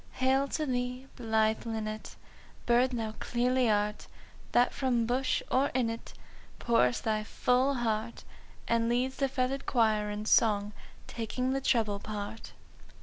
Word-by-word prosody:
"Hail 265 +2 +2
to 305 +3 -2
thee, 250 0 -2
blithe 220 -2 +1
linnet, 220 -1 -5 0.5
Bird 240 +2 +4
thou 225 -3 -3
clearly 250 0 +1
art, 210 0 0 0.4
That 245 - +3
from 250 -4 +1
bush 255 +3 0
or 270 +2 +3
in 240 -3 +1
it 230 - -8 0.4
Pourest 125 - +2
thy 215 -1 0
full 250 +5 +1
heart! 230 -1 -2 0.4
And 230 0 +2
leads 255 +2 0
the 275 - +1
feathered 265 +1 -2
choir 215 -3 +2
in 210 +1 -4
song 210 -2 +3 0.3
_Taking 250 +3 -2
the 270 - -1
treble 220 -6 +1
part. 210 +1 -6
235 Hz, 140 wpm, -30 LUFS, 215-255 Hz, 0.5 s, Bird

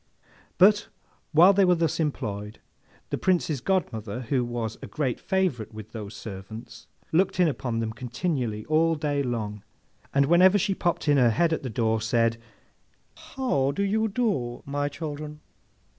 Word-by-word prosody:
But, 205 +3 +5 0.4
while 170 +5 +7
they 200 0 +4
were 180 -1 +5
thus 165 -1 0
employed, 105 -9 -3 0.5
the - - -1
Prince's 165 -7 +1
godmother, 125 - -1
who 125 +1 0
was 120 -2 -4
a - - -7
great 135 -6 -2
favourite 160 - -1
with 110 0 -9
those 105 -2 -7
servants, 110 +3 -9 0.2
looked 185 +3 +2
in 180 - +5
upon 125 -6 -2
them 110 -1 -2
continually 120 -2 -3
all 160 +1 +2
day 145 -2 -1
long, 110 -5 -3 0.5
and 140 0 +3
whenever 180 +6 +6
she 195 0 +1
popped 175 -3 -1
in 145 -1 +5
her 125 -3 +5
head 165 +8 +2
at - - -2
the 130 - -4
door 110 0 0
said, 115 0 +1 1.0
How 195 - +1
do 200 +8 -1
you 220 +3 +1
do, 195 - -1
my 145 +1 -1
children? 150 0 -6
140 Hz, 160 wpm, -26 LUFS, 115-175 Hz, 1.0 s, while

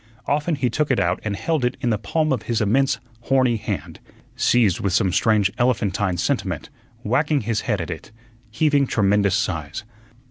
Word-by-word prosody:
Often 150 +3 0
he 130 -3 0
took 150 -1 0
it 130 - +2
out 85 +1 +1
and 105 -2 -2
held 155 +7 -1
it 125 +1 0
in 120 - 0
the 105 - 0
palm 155 +8 0
of 130 - -2
his 115 -2 +1
immense, 130 +6 +2 0.3
horny 130 -3 +3
hand, - - -5 0.4
seized 110 -7 +3
with 100 -3 -1
some 95 -2 +2
strange 105 -4 +3
elephantine 105 -6 +1
sentiment, - - -2 0.3
wagging 150 -2 +1
his 115 -2 -1
head 105 -4 -1
at 85 0 -4
it, 80 +6 -8 0.4
heaving 145 +3 +2
tremendous 100 -3 +2
sighs. 80 -2 -2
115 Hz, 175 wpm, -22 LUFS, 100-135 Hz, 0.4 s, horny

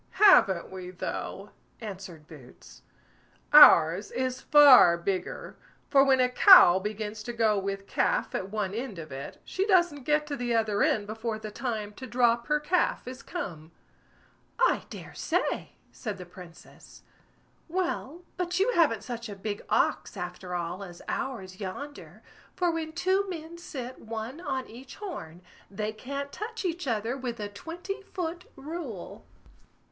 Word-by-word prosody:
"Haven't 195 - +5
we 185 -1 -7
though!" 190 +2 -6 0.3
answered 190 -7 -8
Boots; 135 -6 -15 0.7
"ours 180 - +8
is 255 0 -3
far 275 - +8
bigger; 185 +2 -4 0.3
for 275 -2 +6
when 270 -1 +4
a 250 - +4
cow 250 - +8
begins 210 +1 -5
to 240 - -5
go 220 -3 +2
with 195 0 -4
calf - - 0
at 190 - -3
one 205 -2 -2
end 230 -3 -5
of 160 -3 -8
it, 135 +1 -8
she 380 - -1
doesn't 345 - +2
get 300 0 +2
to 295 -1 -4
the 245 -3 -1
other 215 -2 +1
end 210 -2 +2
before 220 +1 -4
the 215 -1 -8
time 215 -3 -4
to 260 - -9
drop 240 -1 +2
her 300 0 +2
calf 340 0 0
is 255 0 -7
come." 170 - -7 0.8
"I - - +2
dare - - -10
say!" - - -2 0.2
said 210 -5 -6
the 180 - -9
Princess. 175 -1 -15 0.6
"Well, 345 -2 -3
but 360 0 -1
you 420 +6 +3
haven't 305 - +2
such 235 -2 -6
a 205 - -6
big 205 +1 -5
ox, - - 0
after 180 0 -6
all, 175 +3 -4
as 175 -3 -11
ours 190 -8 -4
yonder; 280 +10 -8 0.3
for 355 -2 +1
when 320 -1 -4
two 380 +3 +1
men 335 -1 -7
sit 260 -7 -7
one 225 +6 -6
on 265 -5 -3
each 255 +4 -12
horn, 185 - -8 0.3
they 210 +2 -4
can't 280 +5 -6
touch 450 +1 -6
each 350 -3 -3
other 230 +1 -1
with 250 -3 -5
a 205 -1 -4
twenty 345 - -7
foot 355 -2 -5
rule." 280 - -8
235 Hz, 155 wpm, -28 LUFS, 195-300 Hz, 0.8 s, ours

